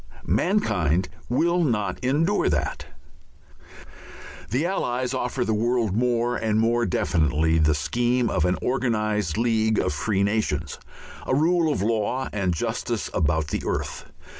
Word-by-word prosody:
Mankind 95 Hz, -, +1 dB, 0.2 s
will 170 Hz, +8 st, +2 dB
not 105 Hz, -, -1 dB
endure 160 Hz, +10 st, +2 dB
that. 70 Hz, -1 st, -2 dB, 1.6 s
The 130 Hz, +9 st, 0 dB
Allies 130 Hz, -8 st, -1 dB
offer 125 Hz, 0 st, -1 dB
the 110 Hz, -, 0 dB
world 115 Hz, -2 st, 0 dB
more 120 Hz, 0 st, +1 dB
and 110 Hz, -2 st, 0 dB
more 115 Hz, +1 st, +2 dB
definitely 80 Hz, -2 st, +1 dB
the 75 Hz, -1 st, +3 dB
scheme 120 Hz, -, 0 dB
of -, -, 0 dB
an 90 Hz, +1 st, +1 dB
organized 110 Hz, -8 st, 0 dB
League 110 Hz, -2 st, +1 dB
of -, -, 0 dB
Free 100 Hz, +4 st, 0 dB
Nations, 100 Hz, -8 st, -1 dB, 0.5 s
a 130 Hz, -, +2 dB
rule 165 Hz, +2 st, +2 dB
of 100 Hz, -, -1 dB
law 115 Hz, +4 st, -1 dB
and 100 Hz, -3 st, 0 dB
justice 85 Hz, -, -3 dB
about 80 Hz, 0 st, 0 dB
the -, -, -2 dB
earth. -, -, -4 dB
110 Hz, 135 wpm, -24 LUFS, 90-125 Hz, 1.6 s, the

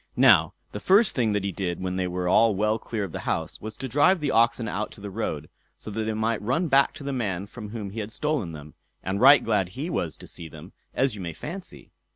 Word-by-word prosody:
Now, -, -, +5 dB, 0.2 s
the -, -, -5 dB
first 200 Hz, +3 st, +4 dB
thing 115 Hz, -5 st, +1 dB
that 105 Hz, -1 st, 0 dB
he 100 Hz, -, -1 dB
did 90 Hz, -2 st, -3 dB
when 90 Hz, 0 st, -3 dB
they 95 Hz, -1 st, -1 dB
were 90 Hz, 0 st, -2 dB
all 110 Hz, +3 st, +4 dB
well 105 Hz, +3 st, +1 dB
clear 110 Hz, -2 st, -4 dB
of 95 Hz, -, -5 dB
the -, -, -5 dB
house, -, -, -3 dB
was 110 Hz, 0 st, -7 dB
to 135 Hz, -, -4 dB
drive 150 Hz, +9 st, +4 dB
the 145 Hz, -3 st, -1 dB
oxen 115 Hz, 0 st, +3 dB
out 105 Hz, +1 st, -3 dB
to -, -, -13 dB
the 100 Hz, 0 st, -7 dB
road, 80 Hz, -8 st, -3 dB, 0.3 s
so 110 Hz, -, -8 dB
that 110 Hz, +1 st, -2 dB
they 110 Hz, -, -1 dB
might 110 Hz, +1 st, -1 dB
run 130 Hz, -, 0 dB
back 140 Hz, 0 st, +4 dB
to -, -, -9 dB
the 140 Hz, 0 st, -3 dB
man 100 Hz, -7 st, -2 dB
from 105 Hz, 0 st, -9 dB
whom 105 Hz, -3 st, -6 dB
he 115 Hz, -, -6 dB
had 105 Hz, 0 st, -5 dB
stolen 145 Hz, -, -1 dB
them; 75 Hz, -1 st, -10 dB, 0.3 s
and 95 Hz, +3 st, -2 dB
right 135 Hz, 0 st, +8 dB
glad 100 Hz, -5 st, +1 dB
he 140 Hz, -, -5 dB
was 80 Hz, -, -2 dB
to -, -, -11 dB
see 85 Hz, -1 st, -8 dB
them, 80 Hz, +5 st, -12 dB, 0.2 s
as 135 Hz, -2 st, +2 dB
you 105 Hz, -, -7 dB
may 85 Hz, -2 st, -5 dB
fancy. 175 Hz, -, -8 dB
110 Hz, 255 wpm, -26 LUFS, 95-130 Hz, 0.3 s, right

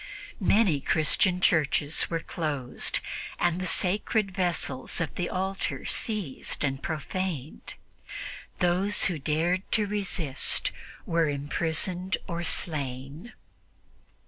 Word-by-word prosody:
Many 195 Hz, -7 st, +3 dB
Christian 175 Hz, +5 st, +2 dB
churches 155 Hz, -3 st, +3 dB
were 165 Hz, -1 st, -1 dB
closed, 145 Hz, -8 st, -1 dB, 0.4 s
and 175 Hz, +1 st, +1 dB
the 185 Hz, -, -1 dB
sacred 200 Hz, +3 st, +2 dB
vessels 175 Hz, -8 st, +1 dB
of 165 Hz, -, -2 dB
the 175 Hz, -, -2 dB
altar 190 Hz, +1 st, -2 dB
seized 205 Hz, -, -1 dB
and 135 Hz, -1 st, -2 dB
profaned. 160 Hz, -2 st, -4 dB, 0.8 s
Those 185 Hz, +3 st, +3 dB
who 170 Hz, -5 st, 0 dB
dared 165 Hz, +5 st, +1 dB, 0.2 s
resist 200 Hz, -9 st, 0 dB, 0.3 s
were 165 Hz, -2 st, +2 dB
imprisoned 165 Hz, +6 st, -1 dB
or 170 Hz, -2 st, -3 dB
slain. 145 Hz, -, -3 dB
170 Hz, 95 wpm, -28 LUFS, 150-185 Hz, 0.8 s, Many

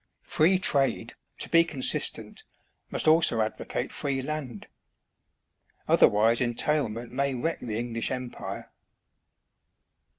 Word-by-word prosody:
Free 175 Hz, +5 st, +2 dB
trade, 140 Hz, -7 st, -1 dB, 0.2 s
to -, -, -3 dB
be 165 Hz, 0 st, +5 dB
consistent, 145 Hz, -6 st, +1 dB, 0.5 s
must -, -, -1 dB
also 155 Hz, -7 st, +4 dB
advocate 110 Hz, 0 st, -3 dB
free 135 Hz, -2 st, -2 dB
land; 135 Hz, -7 st, -6 dB, 1.2 s
otherwise 110 Hz, +4 st, +4 dB
entailment 120 Hz, -2 st, -1 dB
may 135 Hz, +1 st, -1 dB
wreck 160 Hz, +7 st, -3 dB
the 110 Hz, -3 st, -4 dB
English 115 Hz, -1 st, -2 dB
Empire. 125 Hz, -2 st, -6 dB
130 Hz, 100 wpm, -26 LUFS, 115-155 Hz, 1.2 s, be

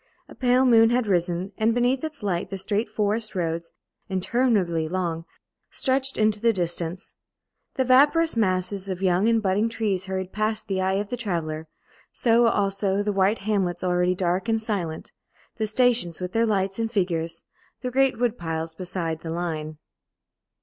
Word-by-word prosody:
A -, -, -13 dB
pale 255 Hz, 0 st, +2 dB
moon 225 Hz, -2 st, +6 dB
had 245 Hz, 0 st, +1 dB
risen, 180 Hz, -1 st, 0 dB
and 225 Hz, +1 st, +2 dB
beneath 250 Hz, +3 st, +1 dB
its 310 Hz, -7 st, -6 dB
light 180 Hz, -4 st, -1 dB
the 195 Hz, -, -4 dB
straight 205 Hz, +3 st, -2 dB
forest 215 Hz, 0 st, -1 dB
roads, 165 Hz, -1 st, -2 dB, 0.4 s
interminably 190 Hz, -5 st, +1 dB
long, 170 Hz, -2 st, -2 dB, 0.4 s
stretched 265 Hz, 0 st, 0 dB
into 215 Hz, -1 st, +2 dB
the 230 Hz, 0 st, +4 dB
distance; 175 Hz, -2 st, 0 dB, 0.6 s
the 260 Hz, -, +1 dB
vaporous 290 Hz, +5 st, +4 dB
masses 190 Hz, -2 st, -1 dB
of 190 Hz, 0 st, -4 dB
young 185 Hz, +3 st, +3 dB
and 225 Hz, -1 st, +2 dB
budding 200 Hz, +4 st, +1 dB
trees 200 Hz, -5 st, -2 dB
hurried 190 Hz, -1 st, -4 dB
past 215 Hz, +1 st, -1 dB
the 190 Hz, -2 st, -1 dB
eye 190 Hz, 0 st, +1 dB
of 200 Hz, +1 st, -2 dB
the 245 Hz, -, -2 dB
traveller; 160 Hz, -8 st, -3 dB, 0.4 s
so, 235 Hz, 0 st, +3 dB
also, 200 Hz, -1 st, 0 dB
the 210 Hz, 0 st, -1 dB
white 195 Hz, +2 st, +2 dB
hamlets, 195 Hz, -4 st, -1 dB
already 180 Hz, 0 st, +1 dB
dark 180 Hz, +4 st, -1 dB
and 225 Hz, 0 st, +1 dB
silent; 180 Hz, -8 st, -3 dB, 0.5 s
the 220 Hz, -1 st, -1 dB
stations 225 Hz, -6 st, +2 dB
with 180 Hz, 0 st, -4 dB
their 230 Hz, +2 st, +2 dB
lights 195 Hz, -1 st, 0 dB
and 225 Hz, -1 st, -1 dB
figures; 170 Hz, -5 st, -1 dB, 0.4 s
the 250 Hz, -1 st, -3 dB
great 270 Hz, 0 st, +2 dB
wood 240 Hz, 0 st, 0 dB
piles 160 Hz, -1 st, -3 dB
beside 170 Hz, -2 st, -4 dB
the 165 Hz, -, -6 dB
line. 160 Hz, -2 st, -4 dB
195 Hz, 165 wpm, -24 LUFS, 175-225 Hz, 0.6 s, moon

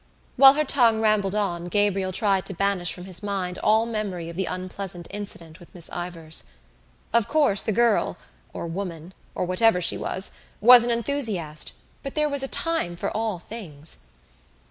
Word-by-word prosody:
While 270 Hz, +1 st, +9 dB
her 305 Hz, -, +2 dB
tongue 240 Hz, -6 st, +3 dB
rambled 210 Hz, -3 st, +1 dB
on 175 Hz, -5 st, -1 dB
Gabriel 195 Hz, 0 st, 0 dB
tried 195 Hz, 0 st, +1 dB
to 195 Hz, -, -6 dB
banish 195 Hz, -2 st, 0 dB
from 180 Hz, -, -6 dB
his 185 Hz, -1 st, -5 dB
mind 195 Hz, -3 st, -3 dB
all 220 Hz, +1 st, +3 dB
memory 205 Hz, -7 st, -4 dB
of 170 Hz, -, -9 dB
the 190 Hz, +1 st, -2 dB
unpleasant 185 Hz, -1 st, -6 dB
incident 185 Hz, -6 st, -8 dB
with 175 Hz, -, -17 dB
Miss 170 Hz, -2 st, -5 dB
Ivors. 170 Hz, -2 st, -4 dB, 0.7 s
Of 235 Hz, -1 st, +3 dB
course 285 Hz, -7 st, +3 dB
the -, -, -1 dB
girl 235 Hz, +1 st, +2 dB, 0.3 s
or -, -, -6 dB
woman, 170 Hz, -1 st, -6 dB, 0.2 s
or -, -, -1 dB
whatever 185 Hz, +2 st, +3 dB
she 175 Hz, -, +1 dB
was, 190 Hz, -, -3 dB, 0.3 s
was 245 Hz, +2 st, +9 dB
an 240 Hz, -, -1 dB
enthusiast 220 Hz, -, 0 dB, 0.3 s
but 275 Hz, -, -7 dB
there 305 Hz, -1 st, +2 dB
was 285 Hz, -2 st, +2 dB
a 270 Hz, -, +1 dB
time 325 Hz, -, 0 dB
for 170 Hz, -, -4 dB
all 220 Hz, -3 st, -1 dB
things. 160 Hz, -, -7 dB
195 Hz, 170 wpm, -24 LUFS, 175-225 Hz, 0.7 s, While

